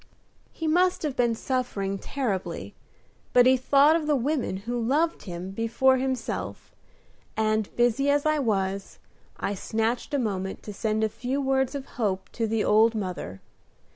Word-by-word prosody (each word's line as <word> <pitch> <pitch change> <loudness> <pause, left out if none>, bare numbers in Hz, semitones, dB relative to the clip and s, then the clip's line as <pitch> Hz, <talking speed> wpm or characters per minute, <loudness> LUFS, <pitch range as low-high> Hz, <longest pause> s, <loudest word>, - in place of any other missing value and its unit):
He 325 - -6
must 360 +3 +2
have 295 -4 -2
been 235 -2 +2
suffering 215 -6 -2
terribly, 220 -9 -3 0.6
but 245 0 +7
he 260 +1 +6
thought 280 +4 +4
of 320 -2 -1
the 300 - +3
women 265 -6 -1
who 240 0 -2
loved 300 +8 0
him 180 0 -6
before 235 +5 +2
himself, 260 0 -3 0.6
and, 215 -1 +1
busy 245 +4 +2
as 285 +1 +2
I 310 0 +2
was, 195 -5 -1 0.4
I 200 - -2
snatched 225 +7 -1
a - - +3
moment 195 -6 -3
to 210 - -7
send 220 +1 -1
a - - +4
few 250 +5 -3
words 265 0 +1
of 275 -1 -4 0.2
hope 195 -3 -1
to 225 -1 -1
the 220 0 0
old 220 +2 +4
mother. 180 - -4
240 Hz, 160 wpm, -26 LUFS, 210-270 Hz, 0.6 s, but